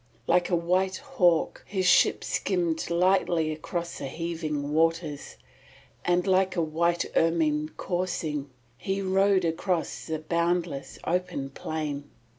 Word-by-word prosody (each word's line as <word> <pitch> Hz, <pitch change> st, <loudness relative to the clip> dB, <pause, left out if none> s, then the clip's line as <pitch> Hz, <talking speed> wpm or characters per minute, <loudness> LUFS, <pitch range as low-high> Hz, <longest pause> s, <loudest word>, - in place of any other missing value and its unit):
Like 180 Hz, -1 st, +2 dB
a 180 Hz, -, +3 dB
white 185 Hz, +3 st, +1 dB
hawk 185 Hz, -, +1 dB
his 190 Hz, -2 st, -1 dB
ship 175 Hz, -, +4 dB
skimmed 170 Hz, -4 st, -1 dB
lightly 170 Hz, -2 st, +2 dB
across 170 Hz, +2 st, -4 dB
the 140 Hz, -, -4 dB
heaving 155 Hz, -2 st, -3 dB
waters, 165 Hz, -2 st, 0 dB, 0.7 s
and 175 Hz, 0 st, +2 dB
like 190 Hz, -1 st, +2 dB
a 170 Hz, -, +1 dB
white 170 Hz, +2 st, +1 dB
ermine 155 Hz, -2 st, +2 dB
coursing 165 Hz, -6 st, -2 dB, 0.3 s
he 195 Hz, +1 st, -2 dB
rode 190 Hz, 0 st, +3 dB
across 165 Hz, +1 st, -1 dB
the 160 Hz, -, -1 dB
boundless 170 Hz, -2 st, -1 dB
open 175 Hz, -6 st, -2 dB
plain. 145 Hz, -1 st, -4 dB
170 Hz, 120 wpm, -27 LUFS, 155-180 Hz, 0.7 s, ship